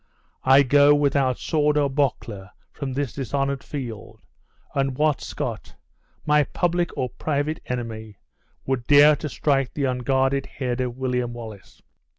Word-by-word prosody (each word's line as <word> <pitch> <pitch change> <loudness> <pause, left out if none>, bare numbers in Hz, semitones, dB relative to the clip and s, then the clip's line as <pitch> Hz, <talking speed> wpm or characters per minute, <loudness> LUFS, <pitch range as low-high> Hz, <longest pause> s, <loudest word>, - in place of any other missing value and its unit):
I 135 +2 +6
go 145 +2 +5
without 140 -3 +1
sword 150 -2 +1
or 145 -1 +3
buckler 125 -8 -2 0.2
from 140 -2 -5
this 140 -2 -2
dishonored 140 0 -2
field, 115 -6 -7 0.5
and 135 -2 -1
what 150 -1 +1
Scot, - - -5 0.5
my 150 0 +4
public 175 +3 0
or 125 - -1
private 150 +4 -2
enemy, 110 -4 -5 0.5
will 130 -2 -1
dare 145 +1 +7
to 150 - -5
strike 135 -1 0
the 145 - -2
unguarded 135 +1 0
head 130 -2 -3
of 125 -1 -3
William 125 -2 -1
Wallace?" 110 -4 -11
135 Hz, 140 wpm, -23 LUFS, 125-145 Hz, 0.5 s, dare